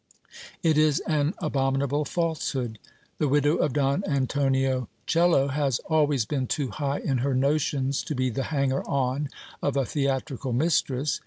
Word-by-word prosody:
It 160 -2 +3
is 155 -2 +3
an 155 +2 0
abominable 140 -1 0
falsehood; 140 -10 -2 0.4
the 150 - +2
widow 145 +2 +3
of 145 - +1
Don 140 +5 +1
Antonio 135 -2 0 0.2
Coello 165 -5 +3
has 140 -3 +1
always 145 -6 +3
been 130 +1 -2
too 140 0 -1
high 140 +1 -2
in 135 -3 0
her 135 +1 0
notions, 140 0 +1
to 150 - -3
be 130 0 0
the 135 +4 -2
hanger 140 -3 +1
on 140 +1 0 0.3
of 145 -1 0
a 135 - +2
theatrical 135 -1 -2
mistress. 140 -1 +1
140 Hz, 150 wpm, -26 LUFS, 130-150 Hz, 0.4 s, It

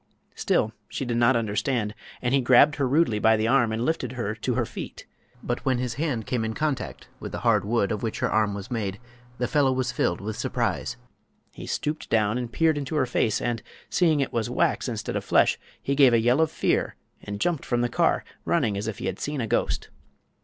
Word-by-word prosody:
Still 110 - +1 0.2
she 135 - -3
did 120 -1 -1
not 120 +2 +4
understand, 110 0 0 0.3
and 125 +1 +1
he 140 - +4
grabbed 130 +4 +5
her 140 -2 +1
rudely 135 -6 +2
by 110 +1 +4
the 110 +1 0
arm 120 -2 +3
and 115 +2 -1
lifted 135 -6 -1
her 120 -4 -2
to 115 +3 -2
her 120 -1 +1
feet. - - -8 0.4
But 120 - -2
when 130 -2 +2
his 125 -1 -2
hand 130 -5 -2
came 120 -3 -1
in 110 0 -3
contact 150 -3 -3
with - - -6
the - - -5
hard - - +3
wood 105 -1 +1
of 105 - -2
which 115 -2 -2
her - - +1
arm 105 -2 +2
was 100 +4 -7
made 100 -4 -2 0.4
the 125 - 0
fellow 145 -3 +3
was 130 -1 0
filled 85 - 0
with 105 +2 -4
surprise. - - -2 0.6
He - - -9
stooped 150 +1 -3
down 110 +1 +2
and 120 -2 -5
peered 160 0 +2
into 140 +2 -4
her 145 -4 +3
face, 120 -3 +1
and, 120 -2 -2 0.3
seeing 160 -5 +3
it 135 - -2
was 115 -2 -1
wax - - +1
instead - - -4
of - - -1
flesh, - - +3 0.2
he 140 - -1
gave 135 -3 +6
a - - +4
yell 120 +6 +3
of 160 - +3
fear - - 0 0.3
and 100 0 -6
jumped 165 +3 0
from 120 -1 0
the 120 - +2
car, - - +1 0.2
running 105 -2 +1
as 105 +2 -3
if 110 - -4
he - - -5
had 95 - -3
seen 150 -1 -3
a 120 - 0
ghost. 110 - -1
120 Hz, 225 wpm, -25 LUFS, 110-135 Hz, 0.6 s, gave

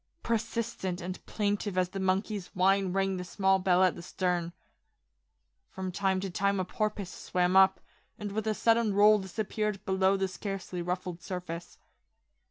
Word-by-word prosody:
Persistent 225 -5 -2
and 180 +1 -6
plaintive 205 -2 -1
as 180 -1 +2
the 195 - -5
monkey's 190 +1 0
whine 190 0 +3
rang 195 0 0
the 180 - -4
small 190 +1 +2
bell 185 -1 +3
at 185 - +4
the - - -9
stern. 175 -1 -1 1.2
From 190 -1 -5
time 190 0 +1
to 195 -1 -4
time 200 +2 +1
a 185 - 0
porpoise 210 -2 -2
swam 180 +1 0
up, 190 -1 +6 0.4
and 205 -1 -5
with 220 +1 -2
a 215 - +1
sudden 230 -2 +2
roll 210 +1 +6
disappeared 210 +1 -3
below 190 +1 +2
the 195 0 0
scarcely 190 -1 -5
ruffled 180 0 -3
surface. 175 -1 -6
190 Hz, 160 wpm, -30 LUFS, 180-205 Hz, 1.2 s, up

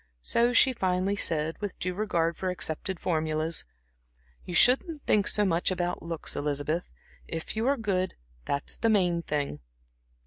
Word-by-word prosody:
So 235 - +3
she 260 +2 +5
finally 190 -2 0
said, 160 -4 0
with 205 -2 -4
due 185 0 -2
regard 170 -4 0
for 185 - -2
accepted 180 +1 -3
formulas: 155 -1 -1 0.8
"You 175 - -5
shouldn't 285 - +4
think 205 -1 +2
so 210 - +3
much 170 -2 +1
about 175 -1 -2
looks, 165 -2 -3
Elizabeth. 150 +4 -2 0.4
If 165 +4 -4
you 225 +3 0
are 280 +1 +3
good, 190 -5 -1 0.3
that's 140 +1 -1
the 230 - +1
main 180 -5 +2
thing." 145 - -2
180 Hz, 150 wpm, -28 LUFS, 160-205 Hz, 0.8 s, she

